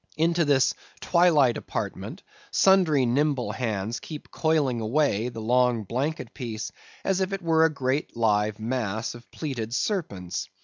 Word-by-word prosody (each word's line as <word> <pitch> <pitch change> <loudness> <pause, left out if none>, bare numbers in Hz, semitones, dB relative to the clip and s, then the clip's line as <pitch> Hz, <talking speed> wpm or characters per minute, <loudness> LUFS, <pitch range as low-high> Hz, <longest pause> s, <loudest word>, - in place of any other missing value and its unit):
Into 170 +1 +2
this 140 -2 +3 0.3
twilight 160 -8 +4
apartment - - -5 0.3
sundry 175 -9 +4
nimble 135 +1 +1
hands 110 -1 -2
keep 150 -2 -9
coiling 150 -7 +1
away 120 -1 +1
the 115 -2 -7
long 125 0 +2
blanket 130 +5 -3
piece 115 -4 -5 0.3
as 195 0 +1
if 190 +1 -1
it 195 - -3
were 160 -1 +4
a - - +4
great 135 -3 -2
live 105 -2 +2
mass 110 -1 -2
of 120 0 -14
plaited 125 -7 -4
serpents. 100 - -2
130 Hz, 140 wpm, -26 LUFS, 115-155 Hz, 0.3 s, twilight